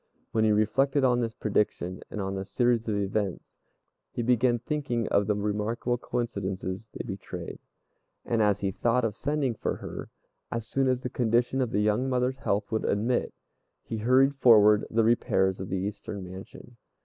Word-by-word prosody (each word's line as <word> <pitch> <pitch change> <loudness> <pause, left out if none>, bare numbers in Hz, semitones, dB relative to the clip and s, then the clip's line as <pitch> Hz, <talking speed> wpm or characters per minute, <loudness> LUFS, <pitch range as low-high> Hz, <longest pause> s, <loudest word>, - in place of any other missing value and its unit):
When 110 -1 +2
he 110 - +4
reflected 135 +7 +2
on 125 -2 +3
this 115 -1 -3
prediction 100 -4 -1
and - - -6
on 95 -1 -2
the 95 0 -3
series 120 +2 +1
of 110 - 0
events, 100 -1 -2 0.6
he 120 - -3
began 120 0 +3
thinking 120 -3 -2
of 100 0 +2
the 105 - +2
remarkable 105 +4 -1
coincidences 100 -4 -3
they - - -6
betrayed; 95 -4 -7 0.7
and 115 -2 +1
as 105 -1 +2
he 100 -1 0
thought 120 +5 +1
of 105 -2 -2
sending 145 -3 -1
for - - -2
her, - - -7 0.4
as 115 -1 -3
soon 135 +3 0
as 130 0 0
the 125 - -2
condition 120 +2 +1
of 125 - 0
the 105 -1 0
young 105 +5 +1
mother's 130 +1 0
health 105 -2 -1
would 110 - 0
admit, 115 +5 0 0.5
he 110 - -5
hurried 130 +5 +4
forward 105 -4 +6
the 115 0 +2
repairs 95 -5 +2
of 95 - -5
the 95 - -1
eastern 100 +1 -5
mansion. 95 +6 -11
110 Hz, 175 wpm, -28 LUFS, 100-125 Hz, 0.7 s, forward